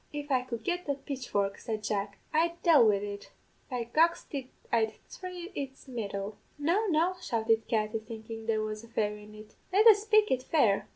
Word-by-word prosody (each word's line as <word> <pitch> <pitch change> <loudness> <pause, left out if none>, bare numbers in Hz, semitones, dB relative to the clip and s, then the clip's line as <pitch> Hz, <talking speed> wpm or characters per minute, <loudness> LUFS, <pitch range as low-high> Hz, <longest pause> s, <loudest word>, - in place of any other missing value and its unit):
"'If 290 0 -5
I 255 -2 +4
could 235 -3 -6
get 355 +5 -2
the 280 - +1
pitchfork,' 255 -8 -2
said 220 -3 -4
Jack, 200 -1 -2 0.2
'I'd 335 +2 +2
dale 310 -9 +7
wid 200 -1 +2
it 205 0 -6 0.4
by 250 -3 -2
goxty 285 0 +1 0.2
I'd 220 -2 +2 0.2
thry 360 -1 -7
its 275 -4 -6
mettle.' 205 -4 -4 0.2
"'No, 345 +9 +1
no,' 350 +2 +2
shouted 225 -5 +1
Katty, 215 0 0
thinkin' 225 0 -8
there 220 -1 +1
was 215 0 -4
a - - -12
fairy 210 -2 -2
in 210 0 -13
it; 215 0 -13 0.2
'let 405 +4 +4
us 420 -3 +8
spake 430 0 +4
it 255 - +2
fair. 250 -8 +2
235 Hz, 185 wpm, -30 LUFS, 215-315 Hz, 0.4 s, us